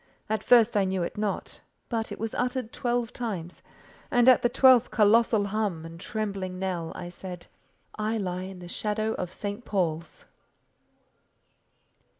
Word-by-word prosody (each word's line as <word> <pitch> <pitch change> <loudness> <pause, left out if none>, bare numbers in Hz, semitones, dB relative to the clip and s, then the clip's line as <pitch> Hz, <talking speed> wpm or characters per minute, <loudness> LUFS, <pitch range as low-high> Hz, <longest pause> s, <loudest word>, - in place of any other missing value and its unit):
At 215 -1 0
first 235 -2 +5
I 205 - +4
knew 190 -1 -1
it 170 - -4
not; 210 -1 -3 0.3
but 225 -2 -2
it - - -5
was 225 0 -4
uttered 250 -1 -2
twelve 240 -1 -1
times, 185 -8 -5 0.5
and 245 0 +3
at 255 - +7
the 240 - +3
twelfth 255 -1 +6
colossal 220 0 +4
hum 200 -6 -2
and 165 0 -10
trembling 195 -3 -3
knell, 180 -3 -3
I 180 - -6
said: 180 0 -8 0.5
"I 215 +1 -1
lie 185 -3 -2
in 190 0 -8
the 175 -1 -10
shadow 215 +4 -1
of 180 -1 -3
St. 205 +4 -4
Paul's." 170 -6 -2
210 Hz, 155 wpm, -27 LUFS, 185-230 Hz, 0.5 s, at